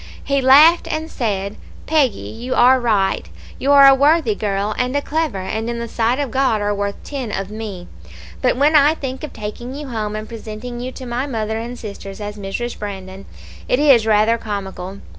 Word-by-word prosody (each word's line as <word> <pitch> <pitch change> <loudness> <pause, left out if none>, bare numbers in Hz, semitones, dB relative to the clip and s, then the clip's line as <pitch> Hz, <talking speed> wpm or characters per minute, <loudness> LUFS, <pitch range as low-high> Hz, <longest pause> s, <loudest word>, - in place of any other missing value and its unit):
He 275 -1 0
laughed, 300 +6 +6
and 315 +1 -3
said, 200 -4 -2 0.3
'Peggy, 280 -9 +2
you 245 +3 -4
are 255 +2 +6
right; 210 -5 0 0.3
you 275 - +1
are 280 -1 +8
a 270 - +9
worthy 285 -3 +3
girl 200 0 -2
and 250 +2 -1
a - - +3
clever, 315 -7 -1
and 220 +4 -3
in 235 - -3
the 235 0 -4
sight 230 +2 0
of 280 -4 -2
God 260 -5 +1
are 205 0 0
worth 200 0 -2
ten 265 -6 -5
of 195 0 -4
me; 210 -5 -7 0.5
but 250 -1 +2
when 295 +3 +3
I 295 +1 +6
think 265 -2 -6
of 305 - -5
taking 230 +4 -7
you 290 -1 -7
home 215 -3 -3
and 215 0 -5
presenting 230 +2 -7
you 250 +1 -5
to 260 - -9
my 245 +3 -2
mother 220 -3 -2
and 240 +2 -6
sisters 200 -2 -8
as 205 0 -5
Mrs. 210 +4 -5
Brandon, 195 -1 -7 0.4
it 250 - +3
is 265 -6 +5
rather 220 +2 +3
comical. 195 -2 -6
230 Hz, 200 wpm, -19 LUFS, 210-265 Hz, 0.5 s, a